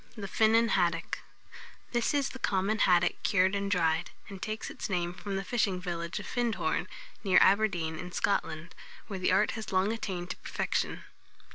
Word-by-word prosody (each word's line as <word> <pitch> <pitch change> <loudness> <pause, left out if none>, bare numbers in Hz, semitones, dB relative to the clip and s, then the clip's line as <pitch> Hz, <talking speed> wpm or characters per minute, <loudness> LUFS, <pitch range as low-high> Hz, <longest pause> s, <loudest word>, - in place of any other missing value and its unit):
THE 200 -2 -5
FINNAN 225 +4 +4
HADDOCK. 170 -4 +1 0.7
This 240 +4 +1
is 280 -1 +1
the 260 - -9
common 200 0 0
haddock 180 -2 +3
cured 190 -2 +3
and 200 0 -1
dried, 165 -4 +1 0.2
and 195 -2 -9
takes 215 0 -4
its - - -5
name 175 -2 -1
from 195 +2 -5
the 195 - -2
fishing 195 -3 0
village 170 -2 -4
of 205 - -8
Findhorn, 240 -3 -1 0.4
near 190 -3 +4
Aberdeen, 175 -6 +3
in 180 0 -6
Scotland, 165 -3 -1 0.3
where 195 -3 -5
the 185 - +2
art 200 +3 +3
has 220 -2 -6
long 190 +3 +2
attained 185 -6 -4
to - - -6
perfection. - - -2
195 Hz, 170 wpm, -30 LUFS, 175-215 Hz, 0.7 s, FINNAN